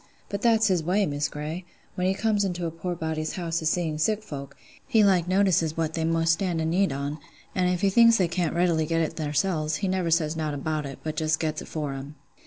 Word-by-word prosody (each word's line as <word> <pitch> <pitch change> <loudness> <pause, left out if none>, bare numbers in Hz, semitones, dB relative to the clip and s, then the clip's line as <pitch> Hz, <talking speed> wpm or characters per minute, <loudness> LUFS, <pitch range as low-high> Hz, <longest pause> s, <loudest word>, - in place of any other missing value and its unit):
But 200 0 -3
that's 225 -2 +4
his 185 -5 +2
way, 185 +5 +1
Miss 145 -2 -1
Grey: 150 +5 -5 0.3
when 180 0 -1
he 190 - +1
comes 210 -1 +1
into 180 -3 -2
a 165 - -2
poor 175 +2 -4
body's 160 -1 -3
house 170 -2 -2
a 160 - -1
seein' 160 -2 0
sick 215 +6 +1
folk, 140 -7 -8 0.3
he 220 -2 +4
like 185 -4 +3
notices 185 -4 +2
what 160 -1 -1
they 160 - -1
most 165 0 +2
stand 175 -1 -1
i' - - 0
need 175 +1 +2
on; 140 +3 -3 0.3
an' 185 -1 +1
if 180 -1 0
he 195 - +3
thinks 230 +2 +6
they 185 - +2
can't 170 -2 -1
readily 170 -3 +2
get 165 +1 +1
it 160 - -2
therseln, 155 0 0
he 195 - -2
never 185 -2 0
says 160 -1 +1
nowt 155 -2 -2
about 150 +1 -2
it, 135 - -8
but 155 -1 -3
just 155 0 0
gets 155 -1 -2
it - - -9
for 150 -3 -3
'em. 135 +2 -8
165 Hz, 240 wpm, -26 LUFS, 155-185 Hz, 0.3 s, thinks